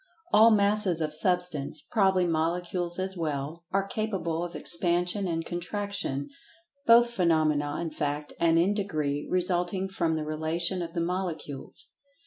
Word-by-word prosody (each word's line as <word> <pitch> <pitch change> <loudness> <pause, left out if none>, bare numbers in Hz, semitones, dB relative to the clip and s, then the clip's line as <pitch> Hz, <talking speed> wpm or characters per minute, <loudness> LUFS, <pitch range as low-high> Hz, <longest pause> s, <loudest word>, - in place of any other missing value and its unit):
All 220 +2 +8
Masses 205 -4 +3
of 155 -1 -2
Substance 165 -3 -1
(probably 190 +1 +2
Molecules 175 +1 -1
as 190 0 0
well) 155 0 -4
are 195 0 +1
capable 195 -6 -2
of 175 0 -6
Expansion 175 +3 +2
and 165 -1 -2
Contraction, 175 -5 -3 0.6
both 235 +1 +6
phenomena, 155 -7 +1
in 170 -2 -3
fact, 150 0 -3
and 165 -1 +3
in 180 +5 +3
degree, 155 -8 -2
resulting 180 +1 0
from 170 -4 -1
the 155 -1 -3
relation 160 +4 0
of 165 -1 -5
the 170 - -1
Molecules. 170 -5 -3
175 Hz, 135 wpm, -28 LUFS, 160-190 Hz, 0.6 s, All